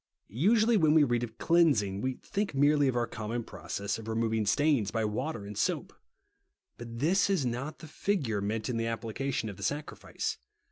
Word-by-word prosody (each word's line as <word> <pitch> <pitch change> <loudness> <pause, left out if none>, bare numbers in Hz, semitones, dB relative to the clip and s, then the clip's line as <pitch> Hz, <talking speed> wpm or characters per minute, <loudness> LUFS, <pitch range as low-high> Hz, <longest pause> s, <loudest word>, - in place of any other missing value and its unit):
Usually 215 - +3
when 155 -4 +4
we 155 - +7
read 120 -4 +1
of 115 -1 -6
cleansing, 125 - +3
we 130 +1 -1
think 200 -6 -2
merely 145 +1 +4
of 130 - 0
our 120 -1 +1
common 115 +1 -4
process 100 -1 -4
of 110 - -9
re 110 - -2
moving 110 -2 0
stains 140 -3 +2
by 115 -1 -1
Avater 110 +2 -2
and 105 +1 -7
soap. - - -1 0.8
But 115 -1 -8
this 175 +11 +2
is 185 -9 +1
not 125 +5 -3
the 160 - -11
figure 145 - -1
meant 105 +2 -2
in 125 -3 -1
the 115 - -1
applica 115 +4 -3
tion 115 - -1
of 100 - -7
the 100 - -8
sacrifice. 145 +8 -3
120 Hz, 195 wpm, -30 LUFS, 110-150 Hz, 0.8 s, we